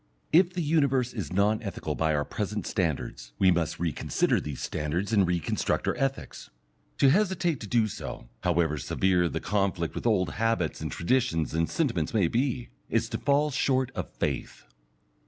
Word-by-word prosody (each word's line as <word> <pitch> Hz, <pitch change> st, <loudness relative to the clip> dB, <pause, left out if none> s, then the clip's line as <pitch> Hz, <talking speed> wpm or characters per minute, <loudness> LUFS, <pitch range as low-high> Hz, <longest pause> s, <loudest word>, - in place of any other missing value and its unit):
If 180 Hz, +2 st, +5 dB
the 180 Hz, -2 st, -1 dB
universe 140 Hz, -5 st, +2 dB
is 100 Hz, -, -5 dB
non 100 Hz, +3 st, +2 dB
ethical 95 Hz, -7 st, -4 dB
by 80 Hz, 0 st, +1 dB
our 75 Hz, 0 st, 0 dB
present 105 Hz, 0 st, -3 dB
standards, 65 Hz, -, -2 dB
we 95 Hz, -1 st, +5 dB
must 85 Hz, -2 st, 0 dB
reconsider 85 Hz, -2 st, 0 dB
these 75 Hz, -3 st, -6 dB
standards 85 Hz, +8 st, -2 dB
and 100 Hz, -4 st, +4 dB
reconstruct 85 Hz, -3 st, -1 dB
our -, -, +1 dB
ethics. 135 Hz, 0 st, -3 dB, 0.5 s
To 135 Hz, -, +5 dB
hesitate 175 Hz, -, +1 dB
to 110 Hz, -, -7 dB
do 115 Hz, +1 st, +2 dB
so, 80 Hz, -, -7 dB
however 85 Hz, -2 st, +1 dB
severe 90 Hz, +4 st, +1 dB
the -, -, -3 dB
conflict 95 Hz, -5 st, -1 dB
with -, -, -3 dB
old 95 Hz, -8 st, +2 dB
habits 115 Hz, -6 st, 0 dB
and -, -, -3 dB
traditions 110 Hz, -, 0 dB
and 80 Hz, 0 st, +1 dB
sentiments 115 Hz, -, -1 dB
may 100 Hz, -6 st, +4 dB
be, 125 Hz, +3 st, -1 dB, 0.2 s
is -, -, +1 dB
to -, -, -3 dB
fall 145 Hz, +1 st, +2 dB
short 130 Hz, -2 st, +1 dB
of -, -, -4 dB
faith. -, -, -3 dB
100 Hz, 170 wpm, -28 LUFS, 85-130 Hz, 0.5 s, If